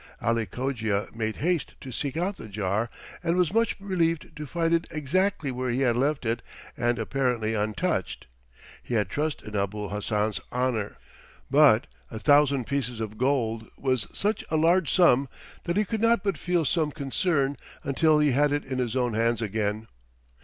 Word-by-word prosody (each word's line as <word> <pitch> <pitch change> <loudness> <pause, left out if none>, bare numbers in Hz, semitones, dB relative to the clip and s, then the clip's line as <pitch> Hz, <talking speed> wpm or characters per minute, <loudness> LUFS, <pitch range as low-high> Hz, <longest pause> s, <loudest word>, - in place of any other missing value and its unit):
Ali 115 -1 0
Cogia 115 -6 -2
made 110 -1 -2
haste 170 -1 -1
to 130 - -8
seek 140 +4 -3
out 185 +4 -1
the - - -9
jar 105 +2 -1 0.3
and 170 0 +1
was 180 -1 +2
much 230 0 +2
relieved 170 -5 -1
to 150 0 -6
find 165 +2 0
it 165 0 +1
exactly 160 +1 0
where 125 0 -2
he 125 +3 0
had 120 -3 +3
left 140 +2 0
it 115 +1 0 0.3
and 120 0 +1
apparently 125 -5 0
untouched. 105 -2 -1 0.6
He 120 - -4
had 105 -4 +1
trust 150 +6 -2
in 105 - -8
Abul 100 +1 -2
Hassan's 105 +1 -1
honor, 125 -4 -1 0.5
but 140 -6 +6 0.2
a 110 - -7
thousand 140 0 +4
pieces 130 -3 -2
of 110 -1 -5
gold 115 -4 0
was 130 -4 0
such 210 +2 0
a 160 - +1
large 165 +1 +3
sum 140 -7 +4 0.4
that 170 +2 -1
he 210 - +3
could 220 +2 -3
not 230 -2 +3
but 195 -2 0
feel 175 -3 0
some 155 +1 +1
concern 140 0 0 0.3
until 155 +2 +3
he 150 -1 +3
had 145 +3 +3
it 145 0 -1
in 130 -1 -3
his 125 -1 -1
own 125 -3 +1
hands 115 +1 +1
again. 110 0 -2
130 Hz, 175 wpm, -26 LUFS, 115-160 Hz, 0.6 s, but